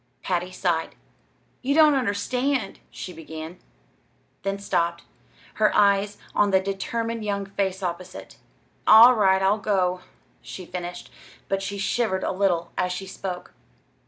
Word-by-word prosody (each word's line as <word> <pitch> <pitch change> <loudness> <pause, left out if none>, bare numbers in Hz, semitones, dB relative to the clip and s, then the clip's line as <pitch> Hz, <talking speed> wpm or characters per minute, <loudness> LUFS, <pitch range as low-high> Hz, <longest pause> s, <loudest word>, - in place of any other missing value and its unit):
Patty 180 0 -1
sighed. 175 -3 -1 0.7
"Ye 275 +2 0
don't 310 -1 +7
understand," 250 0 -1
she 180 - -8
began, 160 +1 -9 0.8
then 195 0 -2
stopped, 170 -4 -1 0.6
her 215 - +5
eyes 200 0 +3 0.2
on 205 - +3
the 190 -1 +4
determined 225 +4 -3
young 200 -1 -2
face 195 -1 -2
opposite. 180 +1 -6 0.5
"All 230 +3 +9
right, 190 -4 +3
I'll 200 +3 +3
go," 185 -3 0 0.4
she 185 - -9
finished, 175 0 -7 0.4
but 195 0 -1
she 200 +1 -4
shivered 195 -1 0
a - - 0
little 185 -3 0
as 180 -1 0
she 185 +2 -4
spoke. 185 -1 -6
195 Hz, 130 wpm, -24 LUFS, 180-210 Hz, 0.8 s, All